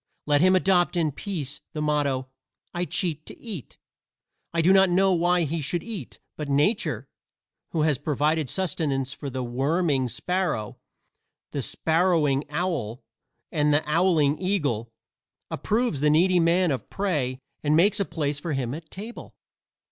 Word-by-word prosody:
Let 145 0 +3
him 185 +1 +5
adopt 185 -1 +3
in 160 -3 +2
peace 150 -4 -4
the 155 - -4
motto, 140 -3 0 0.5
"I 175 0 -1
cheat 165 -4 -1
to - - -10
eat." 200 - -7 0.7
I 170 - -1
do 185 +4 +6
not 190 -1 +6
know 190 +2 +3
why 175 0 +2
he 160 +1 -2
should 165 +4 -2
eat, 225 -5 -7 0.2
but 150 -2 -5
Nature, 150 +11 +1 0.6
who 160 -2 0
has 150 -5 +2
provided 150 0 0
sustenance 145 -8 -1
for 140 - -6
the 130 -1 -3
worming 135 +3 +1
sparrow, 175 - -2 0.7
the 140 - -2
sparrowing 160 -2 +1
owl 145 - -2 0.5
and 150 -1 +2
the 150 +1 +2
owling 160 -5 +3
eagle, 145 - -1 0.6
approves 225 - 0
the 150 - +4
needy 175 +4 +4
man 170 +1 +3
of 135 - -4
prey 150 -11 -1 0.3
and 150 0 +3
makes 205 +6 +4
a - - +3
place 150 -4 -2
for 165 0 -3
him 130 -3 -2
at 160 +1 -8
table. 220 +5 -9
160 Hz, 150 wpm, -25 LUFS, 140-180 Hz, 0.7 s, do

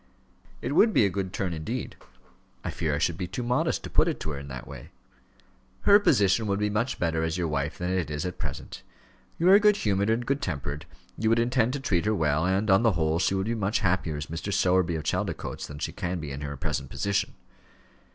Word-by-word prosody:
"It 125 - -1
would 220 +7 +5
be 105 - +5
a 100 - +1
good 95 0 -3
turn, 90 -2 -2
indeed. 105 +10 -4 0.7
I - - -3
fear 80 -3 -1
I - - -1
should 80 +2 0
be 90 - -2
too 95 +7 -4
modest 125 +1 0
to - - -6
put - - +4
it - - -1
to 80 - -3
her 70 - -5
in 70 - -9
that 65 -2 -7
way." - - -10 0.9
"Her 205 0 +7
position 110 - +3
would 100 0 +1
be 105 0 0
much 115 +5 -1
better 80 -2 0
as 80 +1 -1
your 85 -2 0
wife 75 +2 -2
than 90 -1 -2
it 90 -5 -1
is 75 +2 -3
at 90 - -5
present. - - -6 0.6
You 170 - +1
are 200 - +9
good 210 -1 +5
humoured 100 - +1
and 115 +2 +1
good 140 +2 0
tempered, 75 -3 -4 0.3
you 110 - +2
would 115 - +4
intend 120 0 +2
to 140 - -2
treat 95 -10 0
her 110 0 +2
well, 80 -1 +1
and, 95 +3 +1
on 95 +3 +6
the 115 -3 +3
whole, 80 -1 +1
she 95 - +1
would 95 0 -1
be 115 - -1
much 105 -1 0
happier 90 -5 0
as 75 - -4
Mrs. 85 +5 -4
Sowerby, 90 -2 +2
of 80 - -3
Chaldicotes, - - -3
than 75 - -9
she - - -3
can 90 0 -3
be 75 -3 -6
in 70 +1 -6
her 70 -1 -5
present 75 -3 -3
position." 100 0 -1
95 Hz, 240 wpm, -27 LUFS, 80-110 Hz, 0.9 s, are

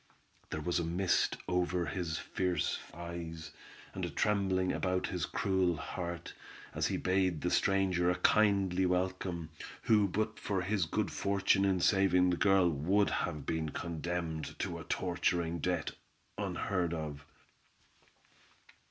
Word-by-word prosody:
There 80 - -3
was 90 +2 0
a - - 0
mist 85 +3 +1
over 90 -1 0
his 80 +1 -3
fierce 90 -4 -1
eyes, 85 -1 -7 0.4
and - - -5
a - - -1
trembling 95 -3 +1
about 90 -1 0
his - - -2
cruel 95 -3 +1
heart, 85 +1 -5 0.4
as - - 0
he - - -1
bade 90 -4 +1
the 90 - 0
stranger 95 -3 +2
a 90 - +2
kindly 95 -3 +3
welcome, 90 -2 -1 0.3
who 105 -3 +4
but 110 +3 -2
for 95 -3 -1
his 95 -1 +1
good - - -1
fortune 100 0 +2
in 95 -2 +2
saving 90 -2 +4
the - - +2
girl, 95 -1 +4
would 90 +8 +2
have 75 -3 -2
been 80 0 -1
condemned 85 0 -4
to - - -3
a - - -7
torturing 85 -2 0
death, 85 -1 -1 0.4
unheard 90 -3 -1
of. 75 -3 -5
90 Hz, 135 wpm, -33 LUFS, 85-95 Hz, 0.4 s, who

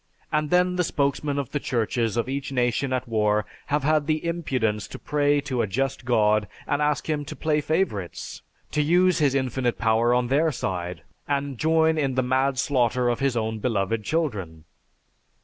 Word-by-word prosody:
And 150 0 0
then 180 +1 +3
the 180 - +2
spokesmen 145 -2 -1
of 140 -3 -3
the 145 - -1
churches 115 -3 -1
of 115 - 0
each 135 +1 -3
nation 125 +1 0
at 130 -1 -1
war 105 -2 +1 0.2
have 145 0 0
had 150 0 +2
the 155 +1 0
impudence 130 -11 -1
to - - -8
pray 145 0 +1
to 130 -4 -2
a - - 0
just 135 +5 -2
God 110 -3 +3 0.2
and 145 0 0
ask 150 -1 0
Him 150 -2 -1
to - - -7
play 155 -1 0
favorites, 125 - -2 0.3
to 150 - +1
use 175 +4 +3
His 140 -3 +2
infinite 130 -2 0
power 115 +1 +2
on 125 0 +2
their 155 +4 +3
side 90 - -4 0.2
and 140 -1 -1
join 160 0 +3
in 135 -3 0
the 130 - +2
mad 130 +1 +1
slaughter 125 -2 +1
of 120 - -1
His 135 -3 +1
own 110 -1 -2
beloved 110 -1 -1
children. 105 - -2
135 Hz, 185 wpm, -25 LUFS, 115-150 Hz, 0.3 s, then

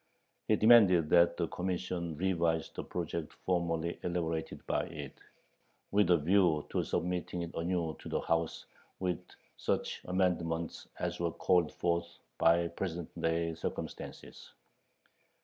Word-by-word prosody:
He 110 - +5
demanded 100 -8 +6
that 85 -1 +5
the 85 - 0
Commission 90 -3 -3
revise 85 -2 +1
the - - -5
project 85 -2 -4
formerly 85 -2 0
elaborated 85 -2 -3
by - - 0
it, 70 -3 -7 0.8
with 100 -3 +3
a 90 - +6
view 85 -1 +3
to - - +1
submitting 90 0 -2
it 85 - -7
anew 85 -2 -1
to - - -8
the - - -1
House, 85 0 -1 0.3
with 90 -1 -2 0.3
such - - -1
amendments 85 -3 -1
as - - -3
were 85 -1 +1
"called 90 -1 +2
forth 85 0 -1 0.2
by 85 +1 +4
present 85 -1 -4
day 85 0 +1
circumstances." 80 - -6
85 Hz, 130 wpm, -32 LUFS, 80-90 Hz, 0.8 s, demanded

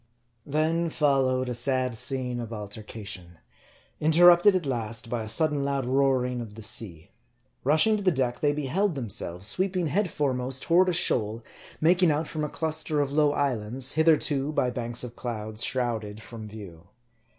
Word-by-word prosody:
Then 160 +3 0
followed 135 -4 +1
a 125 - -2
sad 130 0 0
scene 125 0 0
of 115 -1 -6
altercation; 105 -4 -8 0.6
interrupted 175 +5 +6
at 180 -4 -1
last 115 -3 -4
by 120 -2 -1
a 110 - -6
sudden 150 +1 +1
loud 140 -2 -1
roaring 130 -1 +1
of 105 -3 -9
the 110 - -8
sea. 90 -7 -3 0.5
Rushing 160 - +4
to 205 - -5
the 190 - +4
deck, 130 -6 -1
they 145 - +2
beheld 150 +6 -1
themselves 95 -7 -4
sweeping 180 - +1
head 180 +6 0
foremost 130 -3 -2
toward 180 +2 +4
a - - +2
shoal 115 -8 +1 0.4
making 175 +2 +4
out 150 +1 0
from 155 -1 -4
a 150 - -2
cluster 155 -1 -2
of 140 -1 0
low 145 0 +3
islands, 130 -1 -1
hitherto, 150 -2 +2
by 125 -4 0
banks 120 0 -2
of 120 -1 -8
clouds, 110 -2 -4
shrouded 110 -5 -2
from 110 -1 -9
view. 95 -5 -11
130 Hz, 160 wpm, -26 LUFS, 115-155 Hz, 0.6 s, interrupted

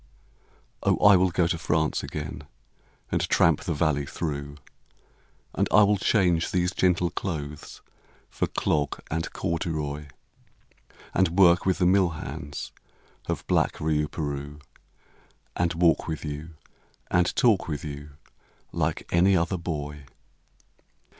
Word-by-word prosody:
Oh - - +2
I 105 -1 +9
will 95 0 +4
go 90 0 +1
to 85 0 -1
France 80 -1 0
again, 75 -1 -6 0.7
and - - +1
tramp - - +4
the - - 0
valley 75 -2 0
through, 70 -3 -4 1.0
And - - +1
I 105 - +7
will 100 0 +3
change 90 -4 +2
these 90 -1 +1
gentle 90 -2 +2
clothes 75 -6 -6 0.4
for - - -2
clog 75 -1 -1
and 80 +1 -2
corduroy, 80 -4 -3 1.1
And 90 -1 +1
work 90 -1 +5
with 95 - +2
the 90 - +2
mill 95 0 +4
hands 70 -1 -6 0.6
of - - -3
black - - +2
Riouperoux, 75 -2 -2 1.0
And 85 -1 0
walk 85 -1 +3
with 80 -1 -4
you, 75 +2 -6 0.6
and 90 0 +2
talk 110 -7 +3
with 75 -3 -4
you, 75 0 -8 0.6
like - - -1
any 95 +2 +4
other 85 +3 0
boy. 75 -4 -5
85 Hz, 125 wpm, -26 LUFS, 75-90 Hz, 1.1 s, I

